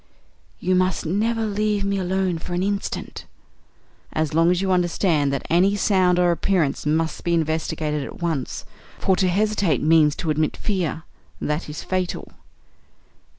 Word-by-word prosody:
"You 185 - 0
must 185 -2 +1
never 220 +6 0
leave 210 -1 0
me 200 0 0
alone 185 -2 0
for 175 - -5
an 180 - 0
instant." 200 0 -3 0.9
"As 155 -1 -1
long 165 +2 +4
as 180 0 +2
you 190 0 0
understand 175 -5 +2
that 140 - -3
any 190 +4 +3
sound 185 -3 +3
or 175 -1 +4
appearance 170 -5 0
must 160 +2 0
be 170 0 +1
investigated 155 -2 -1
at - - -9
once, 160 -7 -3 0.3
for 190 - +2
to 185 - +1
hesitate 200 - +1
means 155 -2 +4
to 160 - -2
admit 155 0 0
fear. 180 -6 -2 0.4
That 150 +1 -2
is 150 +2 -6
fatal." 185 -1 -3
175 Hz, 150 wpm, -23 LUFS, 160-190 Hz, 0.9 s, long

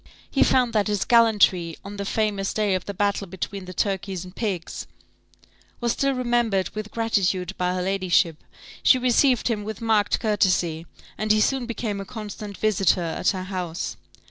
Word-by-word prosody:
He 275 - +1
found 250 -2 +3
that 210 -1 +2
his 205 -2 0
gallantry, 205 -8 +4
on 205 +1 -7
the 200 - -3
famous 205 -2 -1
day 210 -2 +1
of 185 -1 -2
the 200 - -4
battle 200 0 0
between 190 +2 -5
the 185 - -8
turkeys 190 -2 -2
and 180 +1 -12
pigs, 190 -7 -3 0.9
was 240 -1 +1
still 275 +3 +1
remembered 240 -6 +1
with 215 0 -6
gratitude 195 -5 0
by 180 0 0
her 180 - -1
ladyship; 185 -4 +1 0.4
she 260 - +6
received 250 0 +3
him 220 -4 -1
with 215 0 -6
marked 220 -3 +2
courtesy, 180 -6 +1 0.3
and 215 0 +1
he 215 - +4
soon 255 +2 +1
became 215 -3 -3
a - - -7
constant 210 -2 -7
visitor 195 -4 +2
at 165 - 0
her 185 -2 -2
house. 180 -3 -4
205 Hz, 170 wpm, -24 LUFS, 185-225 Hz, 0.9 s, she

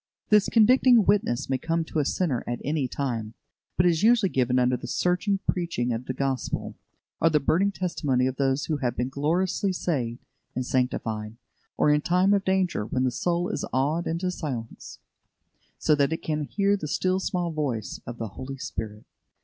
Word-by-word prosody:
This 210 -2 +5
convicting 240 0 +5
witness 195 -12 +1
may 130 -1 0
come 165 +3 -1
to 160 - -2
a 145 - +1
sinner 145 -6 0
at 120 0 -2
any 145 -2 0
time, 115 -5 -3 0.4
but 180 - +4
it - - +6
is 165 -2 +1
usually 220 -3 +4
given 125 -1 +1
under 125 0 +3
the - - -7
searching 180 +3 +1
preaching 145 -9 0
of 115 +2 -4
the 130 - -2
Gospel, 135 -1 -2 0.5
or 165 - +5
the 155 -2 +3
burning 180 +8 +2
testimony 150 -9 0
of 130 0 -2
those 135 +1 +1
who 155 - -1
have 125 -4 -2
been 125 +2 -1
gloriously 175 +8 0
saved 130 -10 -2 0.3
and 130 - -2
sanctified; 115 -4 -2 0.4
or 150 - +4
in 150 0 +3
time 180 +5 +3
of 200 -1 +2
danger, 190 - +1
when 130 +4 -1
the 130 - +1
soul 175 +7 0
is - - -3
awed 145 +6 0
into 175 +3 -1
silence, 130 -10 -6 0.8
so 155 - +2
that 145 0 +2
it 160 - -3
can 150 -1 -1
hear 200 +6 +1
the 175 -6 -5
"still 185 +5 0
small 180 -3 -2
voice" 135 -9 -3
of 120 0 -6
the 115 -2 -4
Holy 130 +7 -7
Spirit. 105 -4 -6
150 Hz, 190 wpm, -26 LUFS, 125-180 Hz, 0.8 s, it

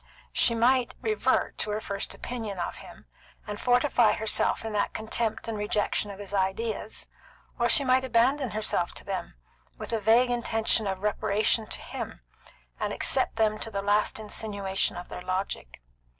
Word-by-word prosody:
She 235 - +5
might 245 +2 +3
revert 430 -1 +1
to - - -1
her 210 +1 -1
first 200 -1 -4
opinion 225 -5 -5
of 175 - -3
him, - - -13 0.4
and 210 -1 -6
fortify 245 -3 +4
herself 220 +1 +1
in 220 - -4
that 205 - 0
contempt 220 0 -2
and 225 - -2
rejection 210 0 0
of 200 - -7
his 200 -1 -7
ideas, 205 +3 -1 0.5
or 240 0 +3
she 280 - +5
might 260 0 +3
abandon 260 +2 +2
herself 210 -5 -1
to - - -8
them, - - -5 0.4
with - - -6
a 225 - +1
vague 230 +4 +4
intention 225 -2 +2
of 190 0 -3
reparation 210 +1 +1
to - - -1
him, - - -6 0.6
and - - -1
accept - - +1
them 215 -1 +1
to - - -5
the 200 -2 -3
last 205 +2 +2
insinuation 200 -3 -2
of 175 - -7
their - - -7
logic. 185 - -4
215 Hz, 165 wpm, -28 LUFS, 200-235 Hz, 0.6 s, She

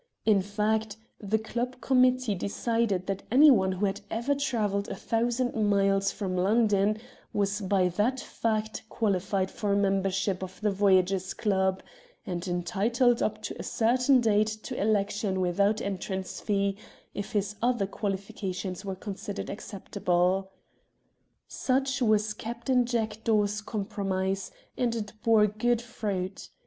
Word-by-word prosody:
In 210 -3 +4
fact, 210 +2 -1 0.2
the 210 +1 0
club 240 +3 -4
committee 255 -3 +3
decided 200 0 -1
that 195 0 -3
anyone 245 -8 +6
who 190 +3 0
had 200 +1 -2
ever 235 +6 0
travelled 220 -8 -1
a - - -4
thousand 240 +2 0
miles 195 -2 +2
from 190 -3 -3
London 210 +1 +3 0.4
was 205 +1 0
by 190 -1 +2
that 215 +9 0
fact 220 -2 -2
qualified 195 -2 0
for 205 -2 -1
mem 195 -1 +2
bership 195 0 -1
of 185 -1 -7
the 210 -1 +2
Voyagers' 190 -1 +2
Club, 190 -3 +1 0.4
and 180 -3 -4
entitled 225 +7 +1
up - - -1
to - - -4
a - - -4
certain 250 +3 +3
date 215 -2 +3
to 215 0 -5
election 205 -2 0
without 200 +4 +2
entrance 190 -1 -4
fee 200 -1 0 0.4
if 205 +3 -5
his 205 0 -1
other 240 -4 +2
qualifications 195 -2 -4
were 195 -1 -4
considered 200 +2 -6
acceptable. 190 -2 -1 1.0
Such 265 0 0
was 215 -2 +2
Captain 240 +3 0
THE 240 - -6
VOYAGERS - - -5
9 225 -2 +2
Jackdaw's 210 -1 0
compromise, 195 -2 -2 0.2
and 240 -2 0
it 210 -2 -4
bore 220 -2 +5
good 220 +3 +1
fruit. 205 -5 -4
205 Hz, 135 wpm, -28 LUFS, 195-225 Hz, 1.0 s, anyone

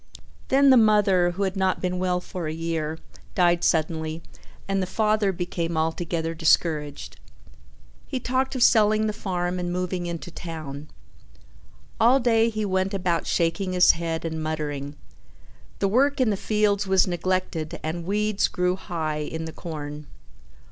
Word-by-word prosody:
Then 275 +1 +5
the 260 - +7
mother, 205 -5 +4
who 185 +3 -3
had 190 0 -1
not 190 -1 +1
been 180 0 -2
well 180 -1 0
for 180 -2 -6
a - - -2
year, 160 -1 -3 0.4
died 175 -1 +3
suddenly, 160 0 0 0.4
and 195 0 0
the 185 - -2
father 215 0 +1
became 170 -2 -3
altogether 165 +1 -1
discouraged. 155 -2 0 0.9
He 260 - -3
talked 260 +2 -1
of 250 - +2
selling 215 -1 +4
the 215 - -1
farm 180 -3 -2
and 175 0 -2
moving 180 0 -2
into 170 +1 -6
town. 155 -4 -7 1.1
All 245 +4 +5
day 230 -2 +3
he 215 -1 -2
went 190 0 0
about 180 -3 -1
shaking 170 +2 0
his 180 0 +7
head 165 -1 -3
and 160 -1 -3
muttering. 145 -2 -4 0.8
The 200 - +1
work 275 +8 +2
in 250 -4 +3
the - - +1
fields 205 0 +1
was 190 -1 +4
neglected 180 -3 -2
and 165 +2 -3
weeds 210 +2 +1
grew 180 -1 0
high 160 -5 -3
in 160 +2 -4
the 160 - -7
corn. 150 -3 -7
180 Hz, 155 wpm, -25 LUFS, 160-200 Hz, 1.1 s, the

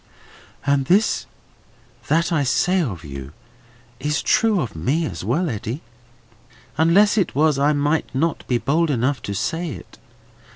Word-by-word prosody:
"All 140 0 +4
this 180 +11 +2 0.8
that 165 +3 +2
I 160 -3 +2
say 180 +7 +2
of 95 - -4
you 70 -1 -8 0.7
is 150 +3 -1
true 220 -4 +3
of 120 - -4
me 135 - 0
as 90 - -5
well, 145 - 0
Eddy. 120 +2 -4 0.9
Unless 195 +7 +4
it 190 - -1
was, 150 -1 +3
I 145 +2 +3
might 145 +2 0
not 160 +5 0
be 125 - +2
bold 160 +6 +1
enough 130 0 0
to 100 - -5
say 165 - -2
it. 95 - -10
145 Hz, 150 wpm, -21 LUFS, 120-165 Hz, 0.9 s, All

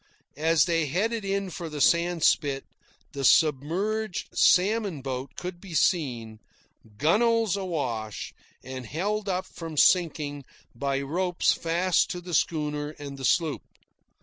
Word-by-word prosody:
As 160 -1 +3
they 165 -3 +1
headed 215 - -1
in 195 -1 -2
for 170 -1 -6
the 150 -1 -6
sandspit, 165 -3 +2 0.5
the 140 -2 -5
submerged 175 - +1
salmon 195 - +3
boat 130 -1 -5
could 180 -1 -6
be 185 -5 -8
seen, 120 -11 0 0.6
gunwales 220 - +2
awash 130 - -4 0.3
and 130 -2 -7
held 205 - -2
up 185 0 -1
from 165 -4 -8
sinking 150 -5 +2 0.3
by 135 +3 -1
ropes 175 +5 +1
fast 170 +2 +1
to 180 - -4
the 175 0 -8
schooner 150 -1 -1
and 140 -1 -8
the 135 - -3
sloop. 160 +1 +1
165 Hz, 125 wpm, -26 LUFS, 140-185 Hz, 0.6 s, As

